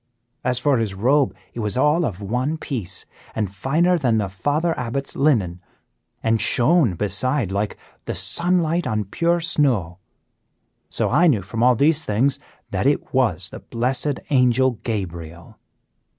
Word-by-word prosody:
As 125 -1 0
for 140 -2 +2
his 105 -4 -2
robe, 125 -1 +2 0.2
it - - -7
was 105 +1 -2
all 150 +5 +3
of 100 -8 -4
one 125 +10 -1
piece, 115 - -4 0.3
and 105 -4 -2
finer 165 - +1
than 120 -6 +2
the 100 -3 -1
Father 145 - 0
Abbot's 125 +3 -4
linen, 105 - +1 0.6
and 115 -1 +2
shone 135 - +4
beside 105 - -1
like 100 +2 -2 0.3
the - - -3
sunlight 170 - +1
on 110 -1 -1
pure 170 - 0
snow. 130 - 0 0.9
So - - -1
I 175 - +4
knew 115 - +2
from 110 +4 -4
all 125 +1 +5
these 150 +5 +2
things 120 +7 +1 0.3
that - - 0
it - - 0
was - - +1
the - - -9
blessed 130 +4 -2
Angel 125 -2 +3
Gabriel." 85 -6 -6
125 Hz, 150 wpm, -22 LUFS, 100-150 Hz, 0.9 s, all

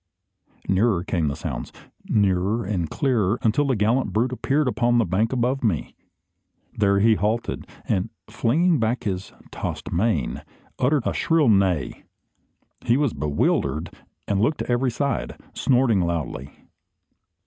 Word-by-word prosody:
Nearer 95 -2 +2
came 85 -4 -1
the 70 - -2
sounds; - - -5 0.4
nearer 100 +2 +1
and 90 -5 -2
clearer, 115 -6 +1
until 130 +6 +2
the 130 - +2
gallant 115 +5 +1
brute 120 +4 +1
appeared 140 +3 0
upon 120 -1 +2
the 115 - +3
bank 95 +6 0
above 130 +1 0
me. 80 - -1 0.8
There 100 -1 +2
he 110 +2 +5
halted, 110 +3 -2 0.2
and, 95 +4 0 0.2
flinging 160 +7 +2
back 115 +2 0
his 95 -2 -3 0.2
tossed - - -5
mane, 85 - 0 0.4
uttered 135 0 +2
a - - 0
shrill 160 -6 +2
neigh. 95 - +1 0.8
He 120 +2 +3
was 145 -5 +1
bewildered, 75 +1 0 0.4
and 100 -1 +1
looked 150 +7 +2
to - - -3
every 125 +2 +2
side, 140 +3 -2
snorting 125 -5 +2
loudly. 80 -6 -3
110 Hz, 135 wpm, -23 LUFS, 95-125 Hz, 0.8 s, he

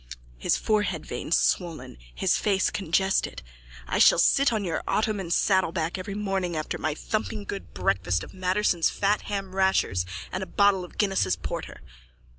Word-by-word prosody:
(His - - +1
forehead 210 -1 0
veins - - -1
swollen, 165 - -1 0.2
his - - +2
face 195 -3 +1
congested.) 190 - 0 0.4
I - - -1
shall - - +7
sit 275 -1 +4
on 215 -3 -1
your 165 -3 -2
ottoman 210 -5 0
saddleback 175 -2 +1
every 195 +2 -5
morning 195 -5 -2
after 155 - -3
my 155 -1 -1
thumping 215 +3 -3
good 200 -1 -7
breakfast 95 -1 0
of - - -11
Matterson's 185 -2 +1
fat 205 +1 0
hamrashers 190 - 0 0.2
and 185 - -3
a 190 - -4
bottle 200 -2 +3
of 180 - -12
Guinness's 190 - +1
porter. - - -6
190 Hz, 150 wpm, -26 LUFS, 160-200 Hz, 0.4 s, shall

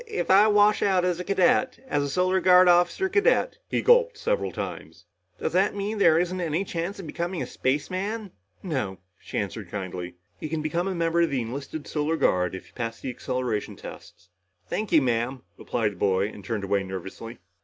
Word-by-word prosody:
"If 435 -1 -2
if - - -1
I 200 +3 +7
wash 210 0 +4
out 185 -2 +2
as 180 -1 0
a - - -3
cadet 195 +7 +2
as 145 - 0
a 140 - -2
Solar 185 +5 +2
Guard 185 0 +6
officer 175 - +4
cadet" 410 +6 +2
he - - 0
gulped 485 0 +4
several - - -1
times - - -7 0.3
"does - - -2
that 195 +3 +2
mean 205 +2 -3
there 165 -5 +5
isn't 180 +2 0
any 170 +3 -1
chance 175 +2 -4
of 190 - -8
becoming 170 +3 -3
a - - -2
spaceman?" 185 - -2 0.3
"No," 130 - -2 0.2
she - - -7
answered 100 -2 -4
kindly. 90 -2 -5 0.2
"You 155 - -5
can 155 0 -2
become 170 +4 -1
a 190 - -2
member 170 0 +1
of 170 - +3
the 135 -3 -1
enlisted 140 +5 -6
Solar 150 +1 -1
Guard, 90 - +1
if 95 - -8
you - - -21
can - - -20
pass 115 -2 -4
the 130 - -4
acceleration 125 -4 -3
tests." 90 - -12 0.4
"Thank 215 - -3
you, 160 -4 +5
Ma'am," 120 +1 -1
replied 110 -3 -1
the - - -13
boy 95 +1 +1
and 105 -2 -11
turned 110 -2 -3
away 100 0 +1
nervously. 95 +5 -7
165 Hz, 205 wpm, -26 LUFS, 115-190 Hz, 0.4 s, I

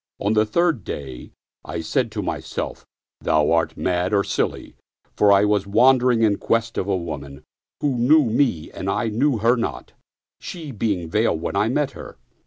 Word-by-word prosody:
On 100 +2 0
the 110 0 +2
third 165 +1 +1
day 65 -3 -7 0.3
I 85 +1 -5
said 115 - -1
to 105 -2 -3
myself, - - -5 0.2
" - - -69
Thou 75 0 +2
art 85 0 +1
mad 90 +3 0
or 100 - +3
silly - - -3 0.2
"; - - -42
for 105 - +4
I 100 +1 +5
was 105 -1 +1
wander 125 +4 +4
ing 115 -2 +2
in 105 -2 +2
quest 115 0 0
of 95 - -3
a 100 -2 +1
woman 70 -5 -7 0.4
who 140 -3 0
knew 145 +5 +5
me 115 - 0
and - - -5
I 115 - 0
knew 125 +4 +1
her 115 +3 +3
not, 115 - -4 0.5
she 160 -5 -7
being 100 -7 -2
veiled 80 - +1
when - - -4
I - - +2
met - - 0
her. - - -11
105 Hz, 195 wpm, -22 LUFS, 90-120 Hz, 0.5 s, I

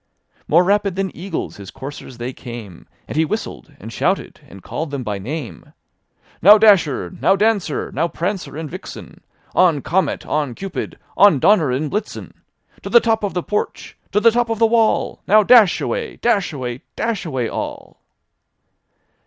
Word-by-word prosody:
More 170 +4 +5
rapid 200 0 +1
than 190 -1 -3
eagles 185 -7 -5
his 100 -1 -10
coursers 135 -2 -9
they 120 +2 -5
came. 115 -9 -10 0.2
And - - -7
he 160 - +3
whistled, 160 -4 -5
and 115 - -9
shouted, 190 +2 -1
and 100 -7 -14
called 160 0 -4
them 140 -2 -4
by 105 -3 -3
name; 120 - -7 0.3
" - - -34
Now, 205 +4 +9
Dasher! 165 - +3
now. 195 - +4
Dancer! 200 -6 0
now, 160 +5 0
Prancer 175 -2 -4
and 160 -1 -5
VixenI 185 +6 -10 0.3
On, 170 -6 +3
Comet! 190 +3 -1
on, 145 -5 -2
Cupid! 195 -1 -6 0.2
on, 200 -5 +6
Dunder 165 0 +4
and 140 +4 -2
Blitten! 210 +1 -4 0.5
To 195 - -7
the 235 +3 +7
top 225 -2 0
of 200 - -2
the 180 - -1
porch! 210 - -4 0.2
To 205 - +2
the 230 +2 +5
top 240 0 0
of 225 - -1
the 225 - +4
wall! 225 -1 +1
Now, 215 +2 +6
dash 225 -3 +6
away! 475 -2 -3
Dash 205 -7 0
away! 125 -4 -5
Dash 225 -5 -2
away 130 -8 -2
all! - - -6
180 Hz, 170 wpm, -19 LUFS, 135-210 Hz, 0.5 s, Now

